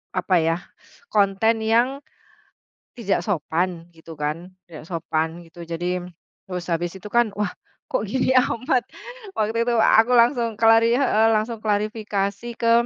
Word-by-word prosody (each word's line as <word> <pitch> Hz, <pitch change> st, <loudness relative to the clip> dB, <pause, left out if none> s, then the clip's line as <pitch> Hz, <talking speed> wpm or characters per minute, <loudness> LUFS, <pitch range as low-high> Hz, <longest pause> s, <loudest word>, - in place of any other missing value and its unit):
Apa 185 Hz, 0 st, +1 dB
ya, 165 Hz, +1 st, +1 dB, 0.5 s
konten 215 Hz, -, +2 dB
yang 245 Hz, +6 st, +1 dB, 1.0 s
tidak 205 Hz, -4 st, 0 dB
sopan 170 Hz, -2 st, -2 dB
gitu 165 Hz, -1 st, -13 dB
kan, 155 Hz, +5 st, -4 dB, 0.2 s
tidak 160 Hz, -3 st, -11 dB
sopan 160 Hz, -1 st, -2 dB
gitu 170 Hz, +1 st, -12 dB
jadi 175 Hz, +2 st, -3 dB, 0.4 s
terus 180 Hz, -2 st, -5 dB
habis 170 Hz, +1 st, -1 dB
itu 190 Hz, -, -12 dB
kan 235 Hz, -1 st, +3 dB
wah, 205 Hz, -3 st, 0 dB, 0.4 s
kok -, -, 0 dB
gini 255 Hz, +5 st, 0 dB
amat 255 Hz, +1 st, +2 dB, 0.5 s
waktu 220 Hz, +2 st, 0 dB
itu 240 Hz, -, +1 dB
aku 225 Hz, +2 st, +5 dB
langsung 235 Hz, -1 st, +3 dB
klari 225 Hz, +1 st, +5 dB
heeh, 225 Hz, -5 st, +3 dB
langsung 220 Hz, +2 st, -1 dB
klarifikasi 210 Hz, 0 st, -2 dB
ke 230 Hz, 0 st, +3 dB
210 Hz, 135 wpm, -23 LUFS, 175-230 Hz, 1.0 s, aku